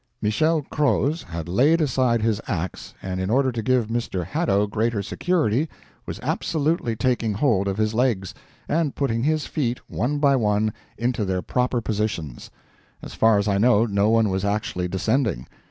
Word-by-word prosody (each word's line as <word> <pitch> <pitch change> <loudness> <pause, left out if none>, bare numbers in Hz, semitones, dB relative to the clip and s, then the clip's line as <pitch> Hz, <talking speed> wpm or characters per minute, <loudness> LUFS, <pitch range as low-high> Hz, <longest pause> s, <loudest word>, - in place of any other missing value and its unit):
Michel 155 +9 +1
Croz 150 +2 0
had 85 -1 -6
laid 140 - +3
aside 125 -6 +1
his 110 -1 +1
ax, 90 -4 -4
and 95 -1 -3
in 95 - -2
order 130 +3 +2
to 115 -2 -3
give 125 0 +2
Mr. 115 -6 -3
Hadow 105 - +1
greater 110 0 -1
security, 150 - 0 0.4
was - - -5
absolutely 150 -6 -1
taking 120 -3 0
hold 105 -5 +2
of 95 0 -2
his 110 0 0
legs, 110 -6 0 0.3
and 160 -3 0
putting 115 -5 0
his 155 +2 +1
feet, 125 -5 -2
one 145 +5 -1
by 140 -1 +4
one, 105 -2 +1 0.2
into 120 -1 -1
their 95 -2 -1
proper 125 -1 0
positions. 105 - -3 0.5
As - - -8
far 110 -1 +4
as 100 +1 0
I 100 -1 +2
know, 115 0 +4
no 100 -1 +1
one 115 -1 +3
was 95 0 -1
actually 100 -3 -1
descending. 100 - 0
115 Hz, 170 wpm, -23 LUFS, 100-130 Hz, 0.5 s, by